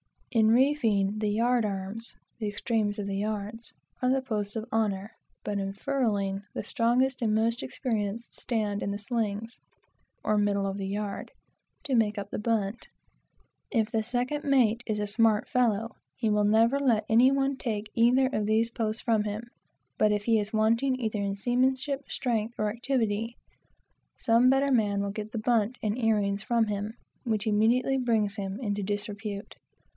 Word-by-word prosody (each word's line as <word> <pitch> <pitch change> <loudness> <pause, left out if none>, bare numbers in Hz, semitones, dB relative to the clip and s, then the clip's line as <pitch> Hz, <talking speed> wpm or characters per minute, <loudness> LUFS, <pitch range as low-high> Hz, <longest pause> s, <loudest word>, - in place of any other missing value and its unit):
In 220 -2 +4
reefing, 225 -6 +3
the 215 - 0
yard 235 +3 +2
arms 200 +3 -4 0.2
(the 215 - -2
extremes 205 0 -1
of 205 - -3
the 195 -1 -2
yards) 215 +2 -3 0.3
are 250 - +2
the 265 +1 +2
posts 210 -5 -3
of 220 -1 -3
honor; 205 -2 0 0.3
but 205 -1 -2
in 195 0 -3
furling, 200 -5 -1
the - - -3
strongest 250 +3 +1
and 215 -2 +2
most 230 +2 +1
experienced 225 -3 -3
stand 210 -4 -1
in - - -2
the 200 - -2
slings, 220 0 -3 0.6
(or, 215 - +2
middle 200 -1 +1
of 195 0 -2
the 195 -1 -3
yard,) 200 0 -4 0.5
to 285 -3 -3
make 215 -2 +2
up 200 0 -5
the - - -3
bunt. 215 -1 -1 0.8
If 225 -3 0
the 225 -2 +1
second 250 +6 -1
mate 245 -5 +3
is 215 -2 -1
a 210 - 0
smart 215 0 +2
fellow, 230 -2 +1 0.2
he 225 -3 0
will 210 0 +3
never 225 +6 +4
let 235 -6 +2
any 235 +4 +6
one 275 0 +1
take 215 -4 -3
either 245 +3 +4
of 215 -6 -1
these 225 +2 +2
posts 220 -1 -2
from 220 -3 +2
him; 215 +3 -4 0.5
but 215 - +4
if 205 -1 -1
he 225 0 +3
is 210 +2 -4
wanting 230 +5 +2
either 220 -3 -2
in 200 -1 -1
seamanship, 260 +5 0
strength, 235 -2 -1
or 215 0 0
activity, 230 -2 -1 0.8
some 235 +2 +4
better 275 +1 +3
man 205 -5 +2
will 200 - -2
get 215 +1 -6
the - - -3
bunt 230 +1 +1
and 210 -1 0
earings 205 -4 +1
from 230 0 +1
him; 205 +1 -3 0.3
which 220 -3 -1
immediately 230 +5 +3
brings 220 -5 +1
him 195 -1 -4
into 205 -3 -1
disrepute. 205 0 -4
220 Hz, 170 wpm, -28 LUFS, 205-240 Hz, 0.8 s, any